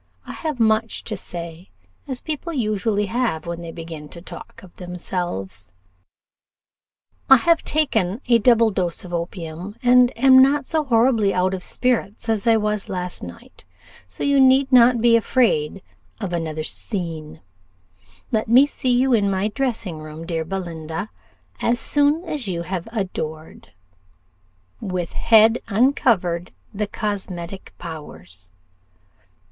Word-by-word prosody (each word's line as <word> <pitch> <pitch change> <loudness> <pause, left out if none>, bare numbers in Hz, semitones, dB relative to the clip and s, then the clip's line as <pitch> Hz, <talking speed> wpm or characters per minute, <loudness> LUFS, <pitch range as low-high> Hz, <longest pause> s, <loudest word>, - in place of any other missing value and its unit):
I - - -7
have 310 -6 -4
much 220 0 +1
to 215 - -4
say, 170 -2 -8 0.4
as 260 -3 -5
people 315 +2 -4
usually 215 -5 0
have 225 -7 -1
when 170 0 -5
they 170 -1 -7
begin 160 -3 -8
to 170 - -8
talk 170 +2 -11
of 180 - -16
themselves. 175 - -5 1.6
"I 270 - +10
have 335 +6 +2
taken 225 - 0
a 235 -1 +5
double 230 -1 +4
dose 180 -2 -2
of 175 - -9
opium, 170 +2 -5
and 250 0 +5
am 260 +1 +7
not 275 +1 +3
so 315 0 0
horribly 230 -4 +3
out 185 +1 +1
of 185 - -4
spirits 230 0 -1
as 220 +1 0
I 225 -1 +5
was 210 -1 -2
last 180 -1 -4
night; 85 0 -11 0.4
so - - -7
you 280 -1 +3
need 265 +1 +5
not 240 -1 +6
be 235 0 +5
afraid 205 - +1 0.4
of 195 -5 -4
another 160 -2 -3
scene. 165 -4 -4 0.9
"Let 220 -1 0
me 250 +5 +7
see 265 -3 -3
you 250 +1 +3
in 205 -3 +3
my 195 +2 0
dressing 220 -8 -3
room, 155 +1 -9
dear 165 -1 -2
Belinda, 165 0 -5 0.5
as 240 0 +1
soon 290 +6 +2
as 290 -9 -4
you 170 -2 -3
have 180 +1 -4
adored 160 -7 -5 1.1
'With 180 -3 -4
head 225 0 +5
uncover'd 200 -7 +1 0.2
the 210 +1 -2
cosmetic 190 -3 -5
powers. 90 - -10
200 Hz, 140 wpm, -22 LUFS, 170-240 Hz, 1.6 s, I